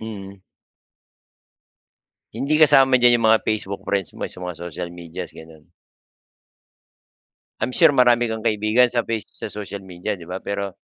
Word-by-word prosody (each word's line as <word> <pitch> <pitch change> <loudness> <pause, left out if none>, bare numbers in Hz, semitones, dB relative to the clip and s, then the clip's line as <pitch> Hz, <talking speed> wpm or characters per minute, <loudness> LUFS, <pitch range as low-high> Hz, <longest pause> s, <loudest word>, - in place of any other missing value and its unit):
Mm. 100 -3 -9 1.9
Hindi 145 +3 -1
kasama 135 -3 +6
diyan 120 0 +7
yung 115 - +1
mga 110 0 +4
Facebook 100 -2 -2
friends 100 -4 -2
mo - - -8
sa - - -11
mga 90 -2 -6
social 85 +1 -6
medias, 85 -2 -8
gano'n? 80 -1 -14 2.0
I'm 120 +3 -2
sure 165 -4 +5
marami 120 -3 +3
kang 110 - -4
kaibigan 110 +2 +2
sa 120 -1 -1
face 115 -2 -4
sa - - -6
social 100 -1 -7
media, 95 +3 -5
'di 85 - -12
ba? 90 +2 -6
Pero, 100 -1 -4
105 Hz, 150 wpm, -22 LUFS, 95-120 Hz, 2.0 s, diyan